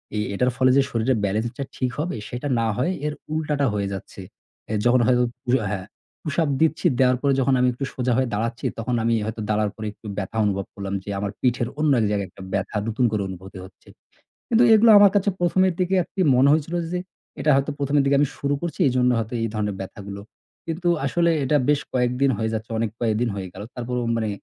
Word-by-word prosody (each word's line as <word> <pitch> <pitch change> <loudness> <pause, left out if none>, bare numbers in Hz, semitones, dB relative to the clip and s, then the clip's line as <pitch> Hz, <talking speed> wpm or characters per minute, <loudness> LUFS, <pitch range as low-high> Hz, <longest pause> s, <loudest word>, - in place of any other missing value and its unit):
এ - - -1 0.2
এটার 125 +5 +2
ফলে 130 -1 +4
যে - - +6
শরীরের 115 +2 +1
balance 110 +4 -1
টা 140 - -2
ঠিক 125 -1 -1
হবে 170 +4 -2
সেটা 125 +4 -5
না 115 - +1
হয়ে 130 +9 +1
এর 150 - -1 0.2
উল্টাটা 150 -2 0
হয়ে 100 -1 -1
যাচ্ছে। 95 0 -8 0.5
অ্যা 110 - -2
যখন 125 +1 +5
হয়তো 125 -1 +4 0.2
পু - - -9 0.2
হ্যাঁ, 95 -2 -4 0.4
pushup 155 0 0
দিচ্ছি, 160 -1 +1
দেওয়ার 125 -1 +4
পরে 140 -1 +2
যখন 135 0 +2
আমি 125 - +3
একটু 135 +3 -4
সোজা 125 -1 0
হয়ে 130 0 +2
দাঁড়াচ্ছি 115 +5 -2
তখন 120 +2 -1
আমি 115 +1 +2
হয়তো 110 0 -4
দাঁড়ানোর 105 0 +1
পরে 110 -1 -5
একটু 105 - -13
ব্যথা 105 +2 -4
অনুভব 100 -1 -1
করলাম 100 -1 -5
যে - - -9
আমার 100 0 -2
পিঠের 125 -2 +1
অন্য 155 -1 +3
এক - - +2
জায়গায় 100 -2 -1
একটা 90 - -15
ব্যথা 100 +2 -1
নতুন 120 +3 +1
করে 105 -2 0
অনুভূতি 95 0 -9
হচ্ছে। 95 - -19 0.6
কিন্তু 235 0 +4
এগুলো 220 +1 +6
আমার 205 -1 +7
কাছে 205 0 +2
১ম 175 +1 +2
এর 180 - -1
দিকে 185 +1 +1
আরকি 190 - -7 0.2
মনে 130 +3 +5
হয়েছিল 155 +2 0 0.2
যে 180 - 0 0.4
এটা 150 - +2
হয়তো 140 +2 0
১ম 140 0 -2
এর - - +4
দিকে 140 0 +3
আমি 145 - +3
শুরু 140 0 0
করছি 170 +2 -4
এজন্য 125 0 +2
হয়তো 115 +1 -3
এই 115 - 0
ধরনের 105 -2 -1
ব্যথাগুলো। 100 +1 -7 0.5
কিন্তু 165 +2 -2 0.2
আসলে 170 +5 +2
এটা 150 +3 +2
বেশ 150 -1 +3
কয়েকদিন 125 +2 +1
হয়ে 110 +1 -1
যাচ্ছে, 110 +1 -5
অনেক 115 -1 0
কয়েকদিন 115 0 +1
হয়ে 95 -2 -5
গেল 95 - -8
তারপরও 125 0 -3
মানে 110 -1 -1
125 Hz, 220 wpm, -23 LUFS, 105-145 Hz, 0.6 s, আমার